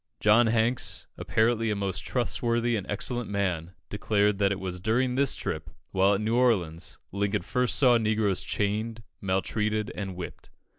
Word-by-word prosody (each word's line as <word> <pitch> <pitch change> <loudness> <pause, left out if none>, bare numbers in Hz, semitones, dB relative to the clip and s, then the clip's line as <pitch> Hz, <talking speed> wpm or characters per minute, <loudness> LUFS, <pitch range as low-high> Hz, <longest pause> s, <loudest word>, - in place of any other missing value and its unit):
John 115 +3 +5
Hanks, 115 +2 +1
apparently 115 0 +1
a 105 - 0
most 95 -2 -1
trustworthy 120 -1 0
and 100 -3 -4
excellent 120 +3 -1
man, 90 -4 -2
declared 105 -1 +1
that 100 -1 +3
it 100 - -2
was 90 -1 -4
during 125 +6 +1
this 135 +1 +2
trip, - - -4 0.2
while 95 +2 +3
at 100 - -2
New 110 +2 0
Orleans, 95 -10 +1
Lincoln 100 0 -1
first 125 +6 0
saw 125 -4 +5
negroes 110 -3 +1
chained, 110 +3 -2 0.2
maltreated, 105 +3 -1
and 95 -3 -5
whipped. 90 -1 -8
105 Hz, 155 wpm, -27 LUFS, 100-115 Hz, 0.2 s, John